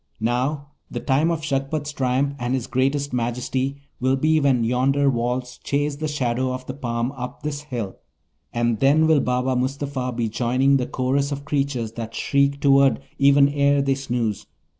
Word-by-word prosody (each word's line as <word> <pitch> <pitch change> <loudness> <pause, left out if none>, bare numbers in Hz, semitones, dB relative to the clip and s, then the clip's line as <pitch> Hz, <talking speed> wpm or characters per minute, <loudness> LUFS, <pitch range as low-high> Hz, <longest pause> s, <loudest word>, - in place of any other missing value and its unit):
Now, 130 +6 -1 0.2
the - - -4
time 145 +4 +2
of 165 -2 -2
Shagpat's 145 +1 -2
triumph, 135 +1 0
and 120 +2 -1
his 125 -3 -2
greatest 135 +2 0
majesty, 130 +3 -2 0.2
will 130 +1 +2
be 155 +3 +2
when 135 -5 +2
yonder 135 +4 +2
walls 125 +1 -2
chase 145 0 -1
the 155 +1 -2
shadow 130 -3 -1
of 130 0 -6
the 130 - -5
palm 120 -2 -2
up 125 +1 -7
this 145 -1 -3
hill; 120 -9 -5 0.5
and 120 -2 0
then 145 +4 +4
will 160 -2 +4
Baba 125 0 0
Mustapha 130 0 -2
be 120 -1 -1
joining 125 +5 +2
the 125 - -2
chorus 135 +2 0
of 140 0 -5
creatures 135 -6 -1
that 115 0 -7
shriek 140 0 +1
toward 140 -1 +4 0.2
even 140 0 +6
ere 140 0 +2
they 135 0 +2
snooze. 120 -6 -2
135 Hz, 170 wpm, -23 LUFS, 125-140 Hz, 0.5 s, even